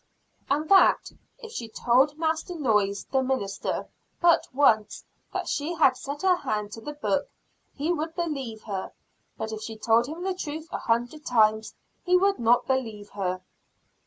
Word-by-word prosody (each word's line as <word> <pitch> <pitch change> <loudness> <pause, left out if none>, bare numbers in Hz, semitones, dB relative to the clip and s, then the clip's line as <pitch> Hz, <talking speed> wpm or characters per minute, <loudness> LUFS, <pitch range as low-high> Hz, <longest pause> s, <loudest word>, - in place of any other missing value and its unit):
And 295 +3 +1
that, 390 - +5 0.3
"if 455 -3 -10
she 235 - -6
told 260 +6 +2
Master 320 +2 -1
Noyes, 210 -9 +1
the 265 - +3
minister, 255 -7 -2 0.3
but 340 -1 +4
once 225 -6 +2 0.3
that - - -3
she 310 +4 -2
had 270 -5 +4
set 280 +5 -6
her 370 -2 +4
hand 210 -8 -3
to 225 - -8
the 295 +6 -6
book, 290 -1 -1 0.5
he 310 +5 0
would 320 0 -4
believe 275 -10 -4
her; 195 -3 -5 0.4
but 220 - -4
if 215 0 -5
she 220 0 -6
told 225 +2 +3
him 325 +5 -6
the 380 0 0
truth 315 -2 -6
a - - -3
hundred 240 +6 -1
times, 220 -2 +2 0.3
he 360 0 +4
would 395 +2 +2
not 235 +1 +3
believe 225 -6 -2
her." 185 -2 -2
265 Hz, 165 wpm, -26 LUFS, 220-315 Hz, 0.5 s, that